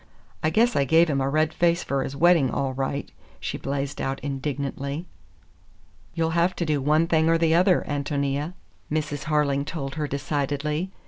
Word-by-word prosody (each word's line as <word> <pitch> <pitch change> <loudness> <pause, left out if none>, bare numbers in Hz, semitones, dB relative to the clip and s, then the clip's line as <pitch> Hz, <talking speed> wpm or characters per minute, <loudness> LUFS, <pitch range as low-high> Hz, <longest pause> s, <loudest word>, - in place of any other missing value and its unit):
I 155 - +2
guess 235 +8 +3
I 140 - +3
gave 160 +3 +4
him 135 -1 0
a 135 - 0
red 155 +2 +1
face 170 +1 +2
for 135 -1 -1
his 135 - -5
wedding, 165 -3 +4
all 130 +3 -1
right!" 135 +2 -3 0.3
she - - -4
blazed 140 0 -3
out 135 0 -2
indignantly. 140 +2 -3 1.1
"You'll 165 -1 0
have 170 +2 +2
to 170 - -2
do 150 -3 0
one 155 +4 +3
thing 160 -1 +2
or 165 - +4
the 165 -1 +2
other, 180 +2 +4
Ántonia," 145 +2 -1 0.4
Mrs. 145 -2 -2
Harling 150 -2 +1
told 140 -3 -5
her 150 - 0
decidedly. 145 +4 -2
150 Hz, 175 wpm, -25 LUFS, 140-165 Hz, 1.1 s, gave